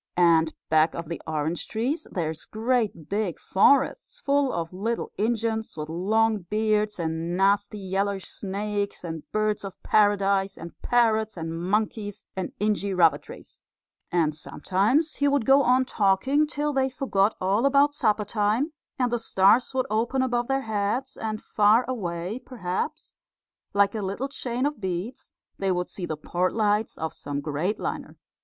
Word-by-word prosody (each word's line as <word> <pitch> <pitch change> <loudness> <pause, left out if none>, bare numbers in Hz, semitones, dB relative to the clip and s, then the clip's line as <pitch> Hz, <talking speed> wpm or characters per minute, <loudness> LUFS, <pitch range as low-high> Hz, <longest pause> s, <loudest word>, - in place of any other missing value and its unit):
And 165 -2 +4
back 155 +1 +3
of 170 -2 -6
the 170 - -5
orange 155 +2 -2
trees 265 +9 -2
there's 160 -3 -3
great 220 - -1
big 200 -3 -1
forests, 280 - +2
full 280 - +1
of 165 0 -4
little 225 +5 -2
Injuns 220 -2 -1
with 150 0 -5
long 215 +6 +1
beards, 210 +2 0
and 165 +1 -2
nasty 200 +2 +2
yeller 195 0 -1
snakes, 200 +1 -4
and 160 -3 -7
birds 215 -1 0
of 195 -2 -7
paradise, 200 -2 +2
and 170 +1 -8
parrots 220 -3 +2
and 165 0 -4
monkeys 205 +3 -2
and 190 -1 -3
inji 205 -2 0
rubber 160 -4 +5
trees," - - -13 0.5
and 165 -3 +2
sometimes 210 - 0
he 285 - +2
would 280 -4 +2
go 270 +1 +6
on 255 0 +3
talking 255 +8 +2
till 295 -1 -2
they 265 -1 +2
forgot 225 -6 +1
all 200 +8 +2
about 280 +1 +4
supper 215 -7 +1
time, 220 +8 0 0.2
and 250 -2 +1
the 240 - 0
stars 210 +2 +3
would 255 -1 +1
open 235 +5 +1
above 240 -2 0
their 270 0 +1
heads, 220 +3 -2
and 215 -1 -4
far 215 +3 +4
away, 185 -3 -3
perhaps, 185 -9 -4 0.6
like 200 0 +3
a 220 - -3
little 200 +8 -3
chain 250 -1 -2
of 290 -5 -2
beads, 190 +6 -4 0.3
they 195 -1 +1
would 180 -1 -1
see 180 -3 -6
the 155 - -3
port 180 +4 -1
lights 215 0 +1
of 160 0 -3
some 145 0 -4
great 155 +8 -2
liner. - - -5
205 Hz, 160 wpm, -26 LUFS, 180-240 Hz, 0.6 s, go